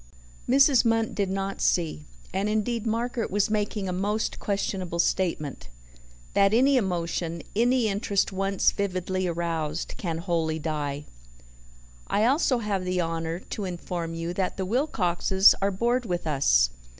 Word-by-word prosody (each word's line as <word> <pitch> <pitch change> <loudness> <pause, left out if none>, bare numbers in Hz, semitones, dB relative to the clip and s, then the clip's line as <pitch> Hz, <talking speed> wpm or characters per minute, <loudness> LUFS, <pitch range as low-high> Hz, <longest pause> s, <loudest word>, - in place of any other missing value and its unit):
Mrs. 275 0 +5
Munt 225 -1 +1
did 200 -2 -1
not 195 0 -3
see, 160 -3 0 0.3
and 195 +2 0
indeed 220 +2 -1
Margaret 230 +1 -1
was 205 +2 +1
making 210 -2 -1
a 180 - -2
most 205 +4 -1
questionable 190 -3 -2
statement 165 - -1 0.6
that 200 +1 +4
any 270 +4 +4
emotion, 170 -5 -1
any 240 +1 +3
interest 200 -1 0
once 195 0 +1
vividly 185 -1 -2
aroused, 165 -2 -2
can 165 -4 -3
wholly 165 -2 -1
die. 150 -2 -3 1.0
"I 210 - +2
also 265 0 +3
have 205 -5 -2
the 180 0 -1
honour 165 0 -2
to 205 - -3
inform 175 -2 -4
you 165 +1 -3
that 185 0 -2
the 190 - -2
Wilcoxes 190 - +3
are 200 - +2
bored 235 +5 0
with 175 -2 -2
us. - - +3
190 Hz, 140 wpm, -26 LUFS, 170-215 Hz, 1.0 s, Mrs